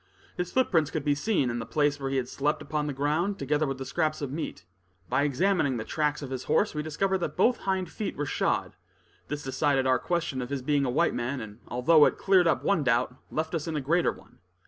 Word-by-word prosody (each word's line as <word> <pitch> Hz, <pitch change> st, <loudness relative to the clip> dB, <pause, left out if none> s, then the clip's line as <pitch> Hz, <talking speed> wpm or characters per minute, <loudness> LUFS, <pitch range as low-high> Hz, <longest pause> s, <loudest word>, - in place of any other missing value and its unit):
His 180 Hz, 0 st, -3 dB
footprints 170 Hz, -, +2 dB
could 155 Hz, -2 st, -4 dB
be 145 Hz, -, +3 dB
seen, 145 Hz, -, 0 dB
and 120 Hz, 0 st, -3 dB
the -, -, -5 dB
place 145 Hz, -1 st, +1 dB
where 135 Hz, -1 st, -3 dB
he 135 Hz, -, 0 dB
had 125 Hz, -2 st, -1 dB
slept 150 Hz, +3 st, -1 dB
upon 150 Hz, 0 st, -2 dB
the -, -, -1 dB
ground, 155 Hz, +8 st, 0 dB
together 150 Hz, +2 st, 0 dB
with 135 Hz, -1 st, -3 dB
the 135 Hz, -, -6 dB
scraps 155 Hz, 0 st, -1 dB
of 140 Hz, -3 st, -4 dB
meat. 150 Hz, -, -5 dB, 0.4 s
By 130 Hz, +3 st, +2 dB
examining 145 Hz, -1 st, +1 dB
the 110 Hz, -, -3 dB
tracks 150 Hz, +3 st, -1 dB
of 135 Hz, -, -7 dB
his 130 Hz, -1 st, -4 dB
horse, 155 Hz, -, +2 dB
we 150 Hz, -, -2 dB
discovered 190 Hz, +5 st, 0 dB
that 175 Hz, -, -4 dB
both 240 Hz, +6 st, +4 dB
hind 190 Hz, -2 st, -2 dB
feet 210 Hz, -, -4 dB
were 145 Hz, -, -1 dB
shod; -, -, 0 dB, 0.5 s
this 150 Hz, 0 st, -4 dB
decided 135 Hz, 0 st, +1 dB
our 130 Hz, -1 st, +3 dB
question 170 Hz, -7 st, -1 dB
of 125 Hz, -, -5 dB
his 140 Hz, -2 st, -3 dB
being 145 Hz, 0 st, +2 dB
a -, -, 0 dB
white 160 Hz, +7 st, +2 dB
man; 125 Hz, +3 st, -2 dB
and 110 Hz, -1 st, -9 dB
although 145 Hz, +5 st, +5 dB
it -, -, +1 dB
cleared 185 Hz, -3 st, +4 dB
up -, -, +1 dB
one 195 Hz, -7 st, +2 dB
doubt, 125 Hz, -1 st, +2 dB, 0.2 s
left 160 Hz, +1 st, -3 dB
us 165 Hz, -2 st, -2 dB
in 160 Hz, -, -2 dB
a -, -, 0 dB
greater 165 Hz, +6 st, +2 dB
one. -, -, -17 dB
150 Hz, 240 wpm, -28 LUFS, 135-165 Hz, 0.5 s, although